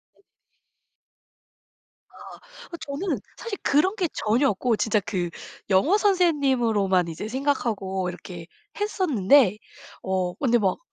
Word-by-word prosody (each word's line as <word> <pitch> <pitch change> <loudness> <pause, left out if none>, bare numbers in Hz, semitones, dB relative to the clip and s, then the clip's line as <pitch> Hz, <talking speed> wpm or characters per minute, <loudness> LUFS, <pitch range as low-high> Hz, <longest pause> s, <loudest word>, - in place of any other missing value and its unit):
네. - - -30 1.9
아. - - -13 0.3
그 340 - -6
저는 285 - -3 0.2
사실 460 -4 -5
그런 370 +9 +2
게 365 -5 0
전혀 235 +6 +1
없고 225 +4 0
진짜 220 -1 +1
그 185 -3 -3 0.4
영어 210 - +4
선생님으로만 260 - +2
이제 165 +6 -6
생각하고 220 -8 -1
이렇게 175 -1 -9 0.3
했었는데 280 - +3 0.4
어 185 -2 -1
근데 240 +1 +2
막 195 -5 0
235 Hz, 230 characters per minute, -24 LUFS, 190-295 Hz, 1.9 s, 영어